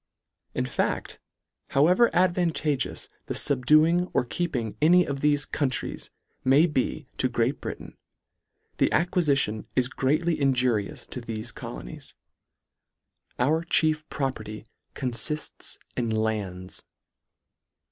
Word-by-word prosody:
In -, -, 0 dB
facl, -, -, -2 dB, 0.5 s
however 180 Hz, +12 st, +4 dB
advantageous 175 Hz, -6 st, +1 dB, 0.2 s
thefubduing 155 Hz, +6 st, +3 dB
or -, -, +3 dB
keeping 125 Hz, -7 st, -2 dB
any 175 Hz, +3 st, +6 dB
of 140 Hz, -1 st, -3 dB
thefe 145 Hz, 0 st, +1 dB
countries 135 Hz, -4 st, -2 dB, 0.3 s
may 135 Hz, +5 st, +6 dB
be 150 Hz, -2 st, -1 dB
to 130 Hz, -, +2 dB
Great 120 Hz, +3 st, 0 dB
Britain, -, -, -7 dB, 0.8 s
the -, -, +3 dB
acquiiition 145 Hz, -, +1 dB
is 125 Hz, -1 st, +3 dB
greatly 155 Hz, +6 st, +1 dB
inju 125 Hz, -7 st, +2 dB
rious -, -, -10 dB
to 125 Hz, -, -5 dB
thefe 110 Hz, -2 st, -5 dB
colonies. -, -, -8 dB, 1.2 s
Our 155 Hz, +7 st, +2 dB
chief 155 Hz, -2 st, +1 dB
property 110 Hz, -6 st, -4 dB, 0.3 s
confifts 130 Hz, +4 st, -2 dB, 0.2 s
in 120 Hz, -2 st, -1 dB
lands. 105 Hz, -5 st, -2 dB
135 Hz, 105 wpm, -26 LUFS, 120-155 Hz, 1.2 s, any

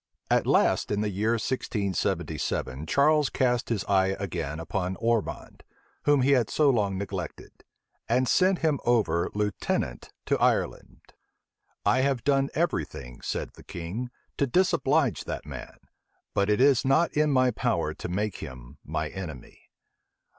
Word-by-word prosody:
At -, -, +3 dB
last, -, -, +3 dB
in 105 Hz, 0 st, 0 dB
the 105 Hz, -1 st, -1 dB
year 105 Hz, +4 st, +1 dB
1677 100 Hz, -, -2 dB
Charles 150 Hz, -, +3 dB
cast 125 Hz, -2 st, 0 dB
his 110 Hz, -4 st, 0 dB
eye 95 Hz, -1 st, +2 dB
again 80 Hz, -6 st, -3 dB
upon 90 Hz, +2 st, -2 dB
Ormond, 115 Hz, 0 st, -2 dB, 0.4 s
whom 145 Hz, -3 st, +4 dB
he 140 Hz, -, +3 dB
had 125 Hz, -5 st, +3 dB
so 150 Hz, -3 st, +4 dB
long 100 Hz, -6 st, 0 dB
neglected; 95 Hz, -2 st, -6 dB, 0.5 s
and 125 Hz, +2 st, +2 dB
sent 185 Hz, +3 st, +3 dB
him 150 Hz, -4 st, +2 dB
over 105 Hz, -9 st, +2 dB
lieutenant 105 Hz, -11 st, -2 dB
to -, -, +1 dB
Ireland. -, -, -1 dB, 0.7 s
"I -, -, +4 dB
have 135 Hz, -3 st, 0 dB
done 140 Hz, -1 st, +2 dB
every 165 Hz, -, +1 dB
thing," 60 Hz, -3 st, -10 dB
said -, -, -3 dB
the -, -, -15 dB
king, 90 Hz, +9 st, -5 dB, 0.3 s
"to 140 Hz, -, +2 dB
disoblige 160 Hz, -, +2 dB
that -, -, -5 dB
man; -, -, -8 dB, 0.6 s
but 100 Hz, +1 st, +1 dB
it 105 Hz, -, +3 dB
is 135 Hz, -1 st, +5 dB
not 135 Hz, +5 st, +3 dB
in 150 Hz, 0 st, +3 dB
my 130 Hz, -2 st, +3 dB
power 110 Hz, -, -1 dB
to -, -, -7 dB
make 100 Hz, +2 st, -2 dB
him 60 Hz, -2 st, -10 dB
my 80 Hz, +1 st, -2 dB
enemy." 80 Hz, -9 st, -9 dB
110 Hz, 145 wpm, -27 LUFS, 95-135 Hz, 0.7 s, is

